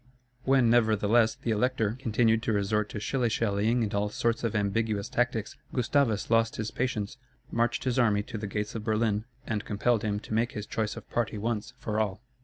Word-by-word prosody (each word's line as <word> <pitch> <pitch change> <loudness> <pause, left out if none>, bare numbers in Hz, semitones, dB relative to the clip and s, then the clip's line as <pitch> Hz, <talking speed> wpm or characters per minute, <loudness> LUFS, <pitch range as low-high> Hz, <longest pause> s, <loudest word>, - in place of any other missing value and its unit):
When 130 -2 +4
nevertheless 110 -1 +4
the 115 - -3
Elector 110 -1 +1
continued 115 -2 +2
to 115 - 0
resort 105 +1 +1
to 105 - -5
shilly 120 +3 0
shallying 110 +2 +1
and 105 - -2
all 100 +1 +1
sorts 115 +2 0
of 115 -2 -1
ambiguous 105 0 0
tactics, 120 -3 -1 0.2
Gustavus 120 -4 +1
lost 115 0 +3
his 110 0 -3
patience, 125 -2 -2 0.3
marched 115 0 +1
his 130 -1 0
army 105 -4 +3
to 110 0 -6
the 105 - -4
gates 105 +1 -3
of 110 - -4
Berlin, 110 -1 +1 0.2
and 110 -2 -2
compelled 110 +2 +1
him 105 -2 -1
to - - -7
make 115 +2 +1
his 105 -1 -4
choice 110 -1 -2
of - - -9
party 115 -2 -1
once, 110 +1 -2
for 110 -3 -2
all. 105 0 -1
110 Hz, 195 wpm, -28 LUFS, 105-120 Hz, 0.3 s, When